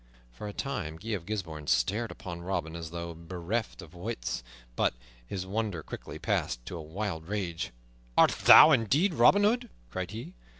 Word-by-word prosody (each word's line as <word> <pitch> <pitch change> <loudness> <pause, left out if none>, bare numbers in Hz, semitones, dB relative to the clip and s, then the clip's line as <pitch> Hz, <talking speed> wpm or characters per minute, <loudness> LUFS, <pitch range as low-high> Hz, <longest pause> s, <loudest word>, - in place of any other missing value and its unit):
For 105 - -8
a - - -4
time 100 - -3
Guy 105 +8 -8
of 95 -6 -3
Gisbourne 80 -8 -4
stared 110 +4 +1
upon 85 -2 -7
Robin 85 -3 -3
as 85 -1 -6
though 85 0 -5
bereft 90 +6 -4
of 85 0 -14
wits; 105 - -4 0.3
but - - +1 0.3
his 95 +4 -4
wonder 100 -4 -2
quickly - - -8
passed - - -1
to - - -6
a 85 - -5
wild 80 0 -4
rage. 95 -5 -2 0.5
"Art - - +7
thou 160 - +9
indeed 145 - +3
Robin 200 +5 +6
Hood?" 240 +3 +2 0.2
cried 95 -1 -3
he. 110 -3 -7
95 Hz, 170 wpm, -29 LUFS, 85-110 Hz, 0.5 s, thou